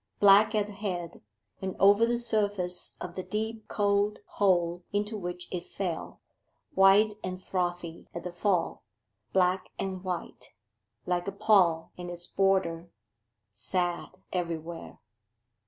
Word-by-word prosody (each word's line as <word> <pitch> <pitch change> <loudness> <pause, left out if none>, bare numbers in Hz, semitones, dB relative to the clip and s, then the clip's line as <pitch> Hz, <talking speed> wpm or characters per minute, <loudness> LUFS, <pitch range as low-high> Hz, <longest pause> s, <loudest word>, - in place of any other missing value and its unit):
Black 205 +2 +7
at 210 -1 +2
the 210 - -9
head, 185 -4 -4 0.4
and 190 -1 -3
over 205 +4 +6
the 240 0 +1
surface 205 -6 -1
of 175 - -6
the 185 - -4
deep 220 +2 -4
cold 205 0 +1
hole 175 -3 +1
into 210 +2 -1
which 180 -3 -5
it 180 -2 -3
fell; 180 -4 -5 0.5
white 205 0 +6
and 185 0 -4
frothy 175 -3 -3
at 170 - -6
the 180 - -4
fall; 180 0 0 0.5
black 185 0 +2
and 190 -1 -4
white, 180 -3 -5 0.5
like 180 0 -1
a - - 0
pall 195 -6 +3
and 175 0 -5
its 175 0 -4
border; 190 -4 +1 0.6
sad 175 - -2 0.2
everywhere. 170 -2 -4
185 Hz, 130 wpm, -29 LUFS, 175-205 Hz, 0.6 s, Black